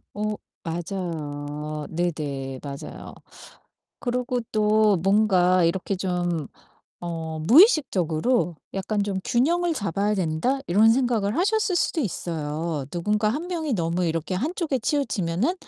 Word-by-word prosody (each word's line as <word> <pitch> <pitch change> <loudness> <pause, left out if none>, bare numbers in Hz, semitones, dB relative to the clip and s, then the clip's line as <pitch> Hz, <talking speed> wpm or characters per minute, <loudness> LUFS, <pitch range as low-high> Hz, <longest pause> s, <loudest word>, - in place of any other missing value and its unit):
어 210 +1 -1 0.3
맞아요. 155 -4 -4
네네 145 -6 -3
맞아요. 140 -1 -8 0.9
그러고 250 0 -1
또 215 -1 +4
뭔가 185 -3 +4
이렇게 180 +4 0
좀 175 -5 -1 0.5
어 165 -2 -4
무의식적으로 225 - +4 0.2
'약간 200 +2 -1
좀 200 -2 -2
균형을 335 +7 +2
잡아야 200 - 0
된다.' 185 +9 0
이런 210 +6 +5
생각을 230 -3 +1
하셨을 405 +1 +2
수도 345 - +1
있어요. 160 - -3
'누군가 210 +5 0
1 295 +10 -2
명이 320 -7 -2
너무 170 0 0
이렇게 165 +2 -2
한 285 - -1
쪽에 315 -8 -1
치우치면은 235 - 0
195 Hz, 260 characters per minute, -25 LUFS, 165-245 Hz, 0.9 s, 이런